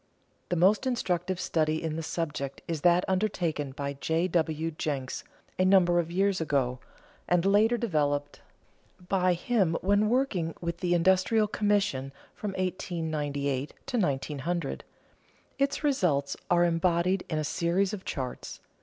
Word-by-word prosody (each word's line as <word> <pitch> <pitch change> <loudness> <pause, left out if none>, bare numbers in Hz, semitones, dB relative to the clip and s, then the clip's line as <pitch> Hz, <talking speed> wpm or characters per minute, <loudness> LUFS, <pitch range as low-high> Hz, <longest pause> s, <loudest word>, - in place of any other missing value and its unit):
_ - - -41
The 180 - 0
most 195 +9 +3
instructive 185 -7 -1
study 160 -3 0
in 160 -1 -2
the 165 - -3
subject 150 -4 -4
is 165 -3 -3
that 175 +2 +4
undertaken 180 -7 -1
by 140 +1 -4
J. 160 +5 0
W. 160 -1 0
Jenks 140 -4 -3 0.4
a 185 - +4
number 180 -2 +5
of 170 -1 -1
years 190 +1 +1
ago, 135 -5 0 0.5
and 175 0 +2
later 215 +4 +4
developed 145 -9 -1 0.7
by 185 -2 +3
him 180 -2 +1
when 205 +2 +3
working 220 -10 0
with 170 0 -3
the 175 -1 +1
Industrial 190 +5 +3
Commission 200 -11 0 0.2
from 205 -2 -5
1898 155 -7 -2
to 250 - -2
1900. 150 0 -2 0.8
Its 280 +2 0
results 165 - +1
are 175 0 +4
embodied 175 +2 +1
in 155 - -1
a 155 - 0
series 180 +5 0
of 195 -3 -5
charts. 130 -4 -5
175 Hz, 140 wpm, -28 LUFS, 155-190 Hz, 0.8 s, number